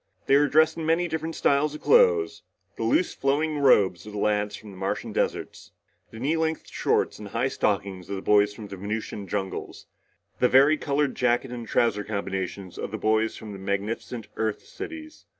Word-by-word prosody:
They 135 - +4
were 145 +1 +5
dressed 160 +2 +4
in 165 - -3
many 170 +2 +2
different 160 0 -3
styles 145 +2 +2
of - - -9
clothes; 460 -4 +4 0.3
the - - -8
loose 325 +6 +2
flowing 150 +2 0
robes 100 - +4
of 105 - -9
the - - -5
lads 105 0 0
from 105 -2 -11
the 95 - -12
Martian 95 +1 -3
deserts; - - -3 0.4
the 110 - -10
knee 145 +7 +1
length 160 -1 -1
shorts - - 0
and 105 - -7
high 115 +6 -1
stockings 95 -6 -1
of 100 - -2
the 95 - -6
boys 105 0 +4
from 105 0 -9
the 100 - -7
Venusian 105 0 -4
jungles; 95 0 -4 0.5
the 125 - +4
vari 140 +4 +6
colored 140 -1 0
jacket 125 +1 +1
and 120 -2 -6
trouser 105 -3 +1
combinations 95 -2 -4
of - - -3
the - - -4
boys 110 +1 +1
from 110 -2 -8
the 100 - -8
magnificent 100 +4 -3
Earth 110 -1 -1
cities. 310 -1 -9
115 Hz, 190 wpm, -26 LUFS, 100-150 Hz, 0.5 s, vari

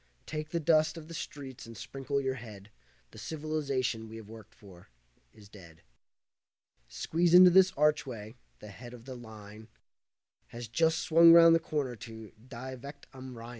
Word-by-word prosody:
Take 155 0 -6
the 170 - -2
dust 155 0 +2
of 155 -1 -10
the 165 - -10
streets 135 -6 -8
and 115 -1 -11
sprinkle 140 +3 -4
your 135 -1 -2
head, 110 -5 -11 0.4
The 110 - -13
civilization 140 -5 -3
we've 110 -1 -10
worked 110 -1 -14
for 90 - -17 0.4
is 105 -1 -17
dead. 85 -6 -16 1.0
Squeeze 165 - 0
into 180 0 +9
this 185 +1 +5
archway, 130 -7 -1 0.3
the 105 - -10
head 120 +4 -11
of 120 -1 -15
the 130 - -8
line 110 -2 -12 0.8
Has 120 0 -9
just 160 +7 +1
swung 165 +1 +6
round 165 0 +8
the 165 - +4
corner 145 -6 -3
to 110 -2 -11 0.2
'Die 130 +1 -8
Wacht 140 +1 -11
am 130 -2 -10
Rhein'. 115 +1 -9
130 Hz, 165 wpm, -30 LUFS, 110-155 Hz, 1.0 s, into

